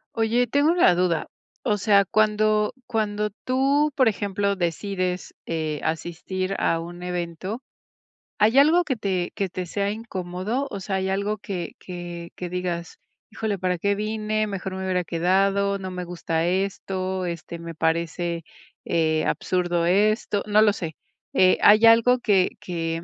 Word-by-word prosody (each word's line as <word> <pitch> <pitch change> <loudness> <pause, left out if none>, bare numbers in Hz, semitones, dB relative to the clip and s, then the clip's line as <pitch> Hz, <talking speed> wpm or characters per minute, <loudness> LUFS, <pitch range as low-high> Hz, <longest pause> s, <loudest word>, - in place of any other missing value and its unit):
Oye, 230 +2 +2
tengo 285 +6 +3
una 340 - +5
duda, 175 -2 +1 0.3
o 210 -5 +1
sea, 200 0 +4
cuando 215 +1 +2
cuando 210 -2 -1
tú 275 +4 +2
por 260 -4 +4
ejemplo 200 -1 -1
decides, 185 +1 -2
eh, 155 -3 -2
asistir 180 +4 -3
a 165 - +1
un 175 +1 -8
evento, 180 +6 -4 0.8
¿hay 220 +5 +4
algo 315 +5 +6
que 280 -6 -1
te 190 -5 -2
que 195 - -1
te 180 0 -5
sea 200 +3 -1
incómodo? 210 +3 -3
O 200 - -4
sea, 195 0 -3
hay 190 0 -1
algo 200 +2 -1
que 185 -4 -5
que 175 -1 -8
que 180 - -5
digas, 175 -1 -4 0.3
híjole, 215 -3 -3
¿para 180 0 0
qué 200 +4 +1
vine? 215 +1 -1
Mejor 195 -2 -4
me 190 0 -4
hubiera 180 -1 0
quedado, 195 +4 +1
no 190 -1 -6
me 180 0 -4
gusta 170 -1 -2
esto, 190 0 -2
este, 170 0 -6
me 170 0 -8
parece, 170 +1 -1 0.4
eh, 160 -1 +1
absurdo 175 -2 0
esto. 205 +3 +2
No 210 +1 +5
lo 210 -2 +4
sé, 165 -6 -5 0.4
eh, 185 0 +4
¿hay 215 +2 +7
algo 230 +2 +6
que 200 -6 +3
que 165 -4 -3
190 Hz, 155 wpm, -24 LUFS, 175-215 Hz, 0.8 s, hay